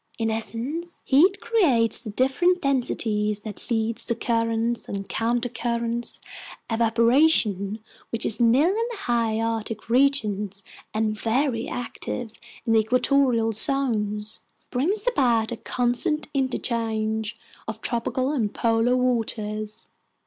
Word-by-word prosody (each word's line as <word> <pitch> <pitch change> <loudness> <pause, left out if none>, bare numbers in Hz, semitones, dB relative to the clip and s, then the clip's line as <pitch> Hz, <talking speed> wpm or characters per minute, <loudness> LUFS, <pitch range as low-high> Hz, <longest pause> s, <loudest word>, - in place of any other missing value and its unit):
In 225 -1 0
essence, 260 +10 -4
heat 365 +9 +4
creates 255 - +2
the 220 - -6
different 270 - +2
densities 215 -7 0
that 210 +2 -9
lead 225 -1 0
to 235 - 0
currents 230 0 -1
and 195 -1 -4
countercurrents. 235 0 -1 0.5
Evaporation, 225 - +3 0.3
which 230 - 0
is 220 - +3
nil 250 +8 +5
in 450 +4 0
the 475 - -6
High 230 - 0
Arctic 225 -1 -3
regions 210 -7 +1 0.3
and 215 0 0
very 230 +2 0
active 240 -1 -5 0.3
in 225 -2 +2
equatorial 240 +1 +3
zones, 215 -4 0 0.3
brings 370 - 0
about 245 - +2
a 235 - -3
constant 245 +7 -1
interchange 225 -4 -1 0.3
of 220 0 -5
tropical 255 +3 -1
and 230 -9 0
polar 230 +2 +2
waters. 215 -3 -2
230 Hz, 115 wpm, -24 LUFS, 220-260 Hz, 0.5 s, nil